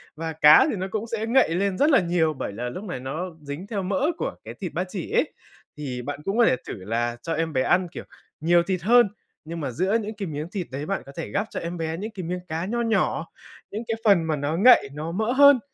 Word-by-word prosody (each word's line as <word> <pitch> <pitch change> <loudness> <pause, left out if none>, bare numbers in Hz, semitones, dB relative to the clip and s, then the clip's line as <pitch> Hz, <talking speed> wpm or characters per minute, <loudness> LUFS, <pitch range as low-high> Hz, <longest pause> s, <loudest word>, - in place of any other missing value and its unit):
và 160 0 -4
cá 150 -1 +7
thì - - -1
nó 190 0 -3
cũng 220 +2 -3
sẽ 220 -1 -2
ngậy 245 -3 +4
lên 195 0 0
rất 295 +3 +4
là 275 - +6
nhiều 170 -2 +1
bởi 115 -7 -5
là 120 +3 -4
lúc 185 +11 -7
này 180 -11 -5
nó 135 +7 -4 0.2
dính 150 +6 -7
theo 205 -3 -3
mỡ 270 +10 0
của - - -3
cái - - -8
thịt - - -4
ba - - 0
chỉ - - -5
ấy. - - +1 0.4
Thì 130 -4 -4
bạn 145 +3 -5
cũng 195 +4 -1
có 235 - +6
thể - - +4
thử - - -4
là 120 +3 -1
cho 165 - -2
em 160 -1 -1
bé 130 - +2
ăn, 180 +6 +2
kiểu, - - -7 0.4
nhiều 170 +2 +4
thịt 185 -1 -2
hơn, 235 +3 +5 0.4
nhưng 165 +1 -6
mà 140 -4 -3
giữa 190 - +1
những 215 +1 -6
cái 200 -3 -4
miếng 150 +1 -4
thịt 185 -4 -4
đấy 140 +3 -4
bạn 195 - -2
có 140 - -11
thể - - -4
gắp 205 +2 -1
cho - - -4
em 170 +1 -5
bé 160 0 -3
những 215 +5 -5
cái 190 -4 -7
miếng 180 +2 -3
cá 165 +2 -3
nho 235 +4 -1
nhỏ. 225 -1 +1 0.5
Những 215 +3 -4
cái 225 - 0
phần 195 -6 +5
mà 160 -1 0
nó 145 +2 -2
ngậy, 240 - +6
nó 155 +3 -5
mỡ 220 +6 -1
hơn 280 0 +7
175 Hz, 265 wpm, -24 LUFS, 150-210 Hz, 0.5 s, cá